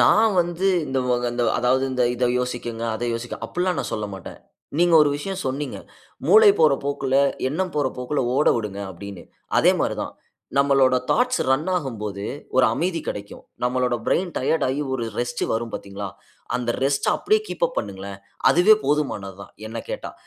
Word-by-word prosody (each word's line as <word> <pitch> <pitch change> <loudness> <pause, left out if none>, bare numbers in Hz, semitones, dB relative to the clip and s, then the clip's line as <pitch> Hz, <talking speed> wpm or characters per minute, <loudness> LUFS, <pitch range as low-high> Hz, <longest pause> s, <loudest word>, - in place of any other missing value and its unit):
நான் 220 +1 +5
வந்து 175 +2 -1 0.2
இந்த 135 -1 -1
வ 125 - +3 0.2
அந்த 120 0 -1 0.2
அதாவது 130 +2 +2
இந்த 125 - +1
இதை 125 +1 +1
யோசியுங்க, 120 -2 -4
அதை 120 +2 -3
யோசிக்க 120 +1 -5
அப்படில்லாம் 180 0 -1
நான் - - -5
சொல்லமாட்டேன். 100 -3 -6 0.4
நீங்க 175 -1 +4
ஒரு 150 - +3
விஷயம் 190 +6 -4
சொன்னீங்க. 135 +2 -3 0.5
"மூளை 435 -1 +8
போற 475 0 +6
போக்குல, 140 -2 -1 0.3
எண்ணம் 180 +5 -2
போற 145 -2 +1
போக்கில 125 +4 -1
ஓட 145 - +3
விடுங்க." 105 -3 -4
அப்படின்னு. 95 0 -9 0.4
அதே - - +5
மாரி - - 0
தான், - - -6 0.5
நம்மளோட 135 -2 +4 0.2
தாட்ஸ் 250 +1 +2
ரன் 150 +7 +1
ஆகும் 135 -10 -4
போது, 100 -1 -4 0.3
ஒரு 130 - +6
அமைதி 170 +4 -1
கிடைக்கும். 100 0 -6 0.2
நம்மளோட 125 0 +1
பிரெயின் 175 -2 +1
டயர்ட் 160 +5 +1
ஆகி 140 +3 -1
ஒரு 120 -3 -2
ரெஸ்ட் 120 0 -2
வரும், 115 0 -3
பார்த்தீங்களா? 100 0 -6 0.5
அந்த 120 -1 -2
ரெஸ்ட்ட 140 0 +1
அப்படியே 430 +1 +2
கீப் - - -1
அப் - - -15
பண்ணுங்களேன். 100 0 -6 0.3
அதுவே 180 +5 +6
போதுமானதுதான், 100 -10 -2 0.2
என்னை 115 +1 -5
கேட்டா. - - -5
130 Hz, 165 wpm, -23 LUFS, 115-165 Hz, 0.5 s, மூளை